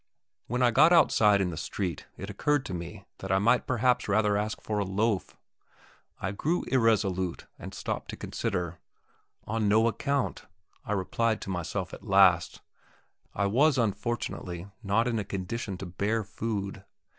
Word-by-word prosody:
When 125 +2 0
I 120 - +5
got 155 +8 +6
outside 105 - +5
in 90 -2 0
the 80 - -6
street 90 +2 -4
it 95 - -6
occurred 140 +8 0
to 95 - -5
me 90 +4 -7
that 95 - -5
I 95 - +4
might 115 +5 +3
perhaps 125 0 +2
rather 105 0 +3
ask 105 +1 -2
for 105 -1 -2
a - - +1
loaf. 100 +1 -1 0.8
I 95 - -2
grew 160 - -1
irresolute, 100 -8 +1
and - - -7
stopped - - -4
to - - -6
consider. 90 -7 -3 0.7
"On 110 -1 0
no 110 +3 +4
account," 140 +3 -1 0.4
I 105 - -1
replied 110 +3 0
to 95 - -5
myself 90 -3 -3
at - - -8
last; - - +4 0.7
I 100 - +1
was 135 +8 +3
unfortunately 100 -5 -2 0.2
not 110 +3 +1
in 115 -2 0
a - - -1
condition 100 +1 -4
to 95 - -6
bear 100 +5 -1
food. 100 -2 -4
105 Hz, 160 wpm, -28 LUFS, 95-115 Hz, 0.8 s, got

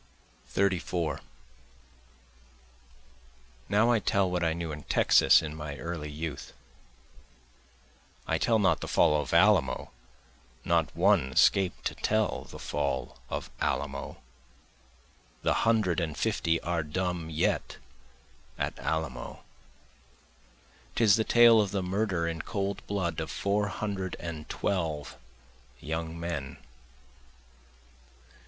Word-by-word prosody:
34 90 -5 -1 2.5
Now 110 +4 +4
I 115 - +3
tell 100 -2 +1
what 90 -1 0
I 80 -1 +2
knew 85 -1 -4
in 75 0 -6
Texas - - +5
in 75 -1 -5
my 75 -2 -6
early 80 -1 -5
youth, 75 -1 -6 1.7
(I - - 0
tell 115 - +3
not 100 -3 +3
the - - -4
fall 75 -1 +3
of - - -6
Alamo, 85 -5 +3 0.7
Not - - +2
one 65 - +3
escaped 95 +6 +3
to - - 0
tell 110 0 0
the - - -11
fall 70 -1 -3
of - - -5
Alamo, 70 -1 -2 1.3
The - - +3 0.2
hundred 100 -7 +2
and 80 -4 -3
fifty 80 0 +1
are 85 -1 -1
dumb 85 +1 -3
yet 80 -1 -1 0.8
at - - -3
Alamo,) 70 -3 -4 1.5
'Tis 110 -4 +5
the 110 - +1
tale 115 -1 +6
of 100 - -1
the 95 -1 -2
murder 95 -2 -1
in 80 -1 -3
cold 100 -2 -3
blood 90 -5 -2
of - - -4
four 105 +1 0
hundred 95 -1 -3
and 80 -3 -7
twelve 80 -7 -2 0.6
young 80 +2 -4
men. 80 -6 -4
85 Hz, 115 wpm, -29 LUFS, 80-100 Hz, 2.5 s, tale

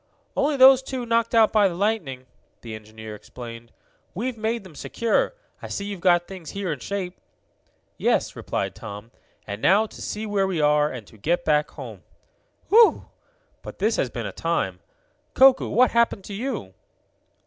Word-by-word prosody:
"Only 290 0 +1
those 260 0 +8
two 260 -2 -5
knocked 230 0 +1
out 225 -1 +5
by 210 -2 +5
the 175 - -4
lightning," 175 -11 -1 0.4
the 115 -2 -8
engineer 110 0 -9
explained. 115 +1 -10 0.4
"We've 240 +6 -2
made 225 0 -2
them 185 -4 -13
secure. 235 - 0 0.3
I - - -6
see 200 - -4
you've 200 -2 -5
got 175 -1 +3
things 185 -5 -9
here 200 -3 -3
in 145 - -8
shape." 185 0 -5 0.8
"Yes," - - +1
replied - - -3
Tom. 105 +3 -9 0.3
"And 100 +1 -6
now 205 +4 +4
to - - -12
see 215 +1 -4
where 200 -2 +1
we 185 -4 -2
are, 150 0 +3
and 125 -4 -7
to 110 - -18
get 170 +11 0
back 150 -1 +2
home. - - -9 0.7
Whew! 450 +1 +5 0.5
But - - -9
this - - +1
has - - 0
been - - -5
a - - -4
time! - - -2 0.6
Koku, 265 0 +6
what 250 +4 +4
happened 235 -4 +2
to 205 - -8
you?" 215 - -4
195 Hz, 170 wpm, -24 LUFS, 150-230 Hz, 0.8 s, those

